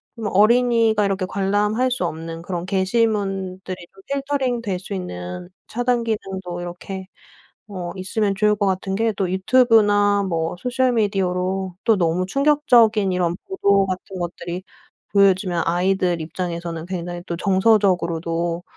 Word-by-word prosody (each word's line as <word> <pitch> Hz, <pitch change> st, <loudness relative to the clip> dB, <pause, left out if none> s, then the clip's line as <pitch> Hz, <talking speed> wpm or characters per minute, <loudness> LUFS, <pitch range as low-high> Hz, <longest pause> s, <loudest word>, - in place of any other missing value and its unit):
좀 225 Hz, -3 st, -4 dB
어린이가 225 Hz, +1 st, +4 dB
이렇게 195 Hz, -1 st, -1 dB
관람할 205 Hz, +6 st, 0 dB
수 250 Hz, -7 st, -1 dB
없는 165 Hz, 0 st, -5 dB
그런 175 Hz, -1 st, -4 dB
게시문들이 195 Hz, -2 st, -1 dB, 0.2 s
좀 195 Hz, 0 st, -18 dB
필터링 270 Hz, -3 st, -1 dB
될 200 Hz, -5 st, -2 dB
수 190 Hz, +3 st, -7 dB
있는 90 Hz, -, -6 dB, 0.2 s
차단 245 Hz, 0 st, 0 dB
기능도 190 Hz, -5 st, -4 dB
이렇게 185 Hz, +2 st, -7 dB, 0.6 s
어 180 Hz, -4 st, -5 dB
있으면 195 Hz, +2 st, -1 dB
좋을 210 Hz, +1 st, +2 dB
것 205 Hz, -1 st, 0 dB
같은 190 Hz, 0 st, -1 dB
게 225 Hz, +1 st, +1 dB
또 190 Hz, -3 st, -1 dB
유튜브나 205 Hz, -1 st, +4 dB
뭐 165 Hz, -1 st, -2 dB
소셜미디어로 195 Hz, -6 st, 0 dB
또 225 Hz, -, +4 dB
너무 175 Hz, 0 st, +1 dB
충격적인 240 Hz, -6 st, +3 dB
이런 175 Hz, -1 st, 0 dB
보도 200 Hz, -, +2 dB
같은 185 Hz, 0 st, -5 dB
것들이 175 Hz, +1 st, -5 dB, 0.5 s
보여지면 190 Hz, -3 st, +3 dB
아이들 180 Hz, 0 st, +1 dB
입장에서는 170 Hz, 0 st, -4 dB
굉장히 175 Hz, -1 st, -5 dB
또 170 Hz, -, -3 dB
정서적으로도 175 Hz, -4 st, +1 dB
190 Hz, 310 characters per minute, -21 LUFS, 180-215 Hz, 0.6 s, 어린이가